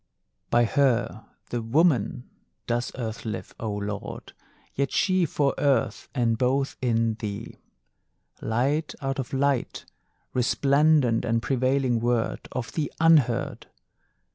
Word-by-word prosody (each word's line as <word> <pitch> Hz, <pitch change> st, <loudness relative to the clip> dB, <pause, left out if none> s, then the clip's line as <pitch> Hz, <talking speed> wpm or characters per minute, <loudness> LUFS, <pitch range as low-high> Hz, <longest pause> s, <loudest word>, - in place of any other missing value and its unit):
By 120 Hz, 0 st, +4 dB
her, 120 Hz, -3 st, +1 dB, 0.2 s
the 120 Hz, -, -1 dB
Woman, 125 Hz, -, +1 dB, 0.4 s
does 120 Hz, +1 st, -1 dB
Earth 115 Hz, -3 st, -4 dB
live, 110 Hz, -, -5 dB
O 110 Hz, -2 st, -3 dB
Lord, 105 Hz, 0 st, -5 dB, 0.4 s
Yet 140 Hz, 0 st, -1 dB
she 185 Hz, -3 st, +2 dB
for 140 Hz, -1 st, +1 dB
Earth, 140 Hz, -2 st, +1 dB
and 115 Hz, -3 st, +1 dB
both 135 Hz, +2 st, +1 dB
in 115 Hz, -3 st, +1 dB
thee. 105 Hz, 0 st, -6 dB, 0.8 s
Light 135 Hz, +8 st, 0 dB
out 135 Hz, 0 st, -3 dB
of 130 Hz, -, -4 dB
light! 135 Hz, -1 st, 0 dB, 0.5 s
Resplendent 140 Hz, 0 st, +3 dB
and 115 Hz, 0 st, +1 dB
prevailing 130 Hz, 0 st, +1 dB
Word 120 Hz, -1 st, -1 dB
Of 115 Hz, -4 st, -4 dB
the 150 Hz, +4 st, -2 dB
Unheard! 155 Hz, -8 st, +3 dB
125 Hz, 115 wpm, -26 LUFS, 115-140 Hz, 0.8 s, By